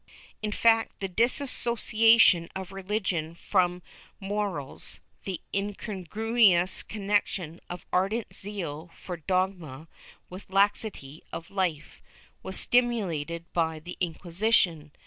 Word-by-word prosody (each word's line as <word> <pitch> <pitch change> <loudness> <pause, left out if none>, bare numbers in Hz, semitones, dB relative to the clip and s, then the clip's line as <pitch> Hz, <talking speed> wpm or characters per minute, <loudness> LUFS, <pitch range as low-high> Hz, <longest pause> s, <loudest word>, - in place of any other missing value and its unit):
^ - - -43 0.4
In 215 -1 -2
fact, 225 +1 +2
the 195 - -2
dissociation 225 -4 +4
of 190 0 -6
religion 190 -4 -2
from 180 -1 0 0.4
morals— 195 -8 -3 0.3
the 190 -4 -4
incon 195 -2 -4
gruous 215 -5 +3
connection 195 -5 -2
of 175 0 -7
ardent 200 +5 0
zeal 175 -5 -6
for 180 -2 -7
dogma 175 -4 -2 0.4
with 185 +2 -11
laxity 195 -7 0
of 165 - -7
life 180 -6 -2 0.4
was 190 - +1
stimulated 175 -10 +2
by 160 -2 0
the 175 +3 -8
Inquisition. 175 -2 +1
190 Hz, 110 wpm, -28 LUFS, 170-210 Hz, 0.4 s, dissociation